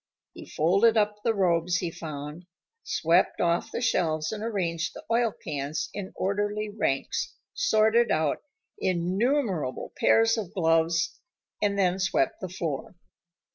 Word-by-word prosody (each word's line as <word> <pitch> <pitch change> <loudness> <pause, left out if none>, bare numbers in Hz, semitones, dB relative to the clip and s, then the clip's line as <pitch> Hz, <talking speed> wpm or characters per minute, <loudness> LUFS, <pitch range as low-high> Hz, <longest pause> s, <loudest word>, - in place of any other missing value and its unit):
He - - -11
folded 195 +9 +3
up 210 -1 +2
the 225 -1 +1
robes 175 -2 +2
he 175 -2 -2
found, 155 +2 -7 0.3
swept 170 - +2
off 170 0 +1
the - - -3
shelves 160 -9 +1
and 215 -1 -5
arranged 170 -7 -2
the - - -9
oil 230 -1 +3
cans 145 -4 -4
in 200 -2 -5
orderly 205 +2 -1
ranks, 135 -10 -1 0.2
sorted 235 - +3
out 155 -2 +1 0.4
innumerable 185 - 0
pairs 225 0 +4
of 195 -5 -7
gloves, 165 -1 +2 0.4
and 200 -1 +1
then 185 -1 +2
swept 190 0 +1
the 185 - -4
floor. 170 -3 -4
185 Hz, 135 wpm, -27 LUFS, 165-210 Hz, 0.4 s, pairs